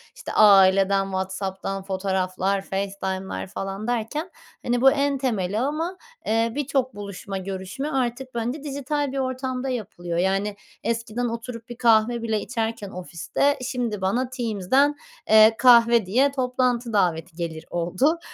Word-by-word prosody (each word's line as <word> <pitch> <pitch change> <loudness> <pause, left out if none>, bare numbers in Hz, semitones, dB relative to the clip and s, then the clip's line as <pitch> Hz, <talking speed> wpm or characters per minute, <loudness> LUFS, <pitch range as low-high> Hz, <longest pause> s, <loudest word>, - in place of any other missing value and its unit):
işte, - - -7
aileden 195 -1 +6
WhatsApp'tan 190 0 -4
fotoğraflar, 190 0 -1
FaceTime'lar 195 -1 -4
falan 195 +3 -5
derken, 245 +8 -2 0.4
hani, 240 0 +1
bu 270 +1 +7
en 280 0 +1
temeli 215 -6 -1
ama, 315 +8 -2 0.3
eee, 225 +1 +1
birçok 270 -4 -1
buluşma 200 -1 -6
görüşme 190 +9 -5
artık, 260 -1 -1
bence, 245 +5 -3
dijital 285 0 -2
bir 275 - -4
ortamda 260 0 -2
yapılıyor, 185 -8 -4
yani, 195 +3 0 0.3
eskiden 230 +1 -2
oturup 230 0 -7
bir 240 - -8
kahve 230 0 +3
bile 220 -2 0
içerken 225 -3 -3
ofiste 185 - -1
şimdi 245 -5 -3
bana 235 +7 0
Teams'den, 255 +3 +1 0.3
eee, 220 +1 +7
kahve 235 -3 +6
diye 255 +9 +3 0.2
toplantı 250 -2 0
daveti 175 -4 0
gelir 165 -2 -5
oldu. 185 - +1
225 Hz, 130 wpm, -24 LUFS, 195-255 Hz, 0.4 s, bu